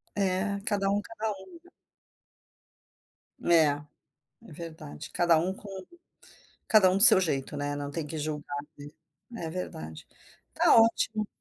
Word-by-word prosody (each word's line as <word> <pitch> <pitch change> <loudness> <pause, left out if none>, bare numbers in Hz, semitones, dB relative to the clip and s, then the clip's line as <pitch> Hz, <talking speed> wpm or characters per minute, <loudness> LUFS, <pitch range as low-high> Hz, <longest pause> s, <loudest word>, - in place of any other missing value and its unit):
É, 200 +1 -1
cada 195 -1 +1
um 205 +1 0
cada 220 0 -5
um, 200 - -11
né. 355 - -21 1.7
É, 165 -2 +4 0.8
é - - -15
verdade, 160 - -10
cada 170 -2 +3
um 180 +4 -1
com 200 +1 -12 1.0
cada 210 -4 +5
um 185 - +1
do 200 - +9
seu 225 -5 +9
jeito, 140 -7 -2
né, 145 0 -3
não 145 0 -6
tem 160 +1 -4
que 160 +1 -6
julgar, 150 -1 -5 0.2
né. 145 0 -10 0.6
É 160 - -4
verdade. 80 - -7 0.5
Está - - +4
ótimo. 225 -1 +2
180 Hz, 140 wpm, -27 LUFS, 150-205 Hz, 1.7 s, do